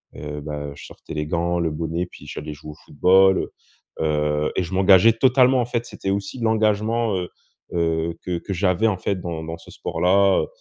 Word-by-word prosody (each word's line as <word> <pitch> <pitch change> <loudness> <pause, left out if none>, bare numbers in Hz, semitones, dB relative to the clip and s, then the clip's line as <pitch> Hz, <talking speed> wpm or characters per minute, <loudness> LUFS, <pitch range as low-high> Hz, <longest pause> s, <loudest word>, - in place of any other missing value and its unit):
heu, 75 0 -6
bah, 75 -1 -5
je - - -11
sortais - - -11
les 75 0 -2
gants, 85 +2 0
le 85 -2 0
bonnet, 80 +3 -2
puis 90 - -14
j'allais 75 0 -6
jouer 75 +1 -10
au - - -13
football, 95 +5 +4
heu, - - -4 0.5
heu 75 -1 0
et 95 - +2
je 90 +2 -7
m'engageais 95 +3 +6
totalement, 130 +1 +4
en - - 0
fait. 120 0 -3
C'était 95 - -6
aussi 100 +5 -3
l'engagement, 110 0 +1
heu, 90 -1 -4 0.4
heu, 85 -1 -1
que 90 -2 -2
que 100 - -7
j'avais 95 +3 +1
en 105 -4 0
fait 95 +1 -2
dans 85 -2 -4
dans 80 +1 -6
ce - - -15
sport-là, 95 +2 +2
heu, - - -4
90 Hz, 205 wpm, -22 LUFS, 80-100 Hz, 0.5 s, m'engageais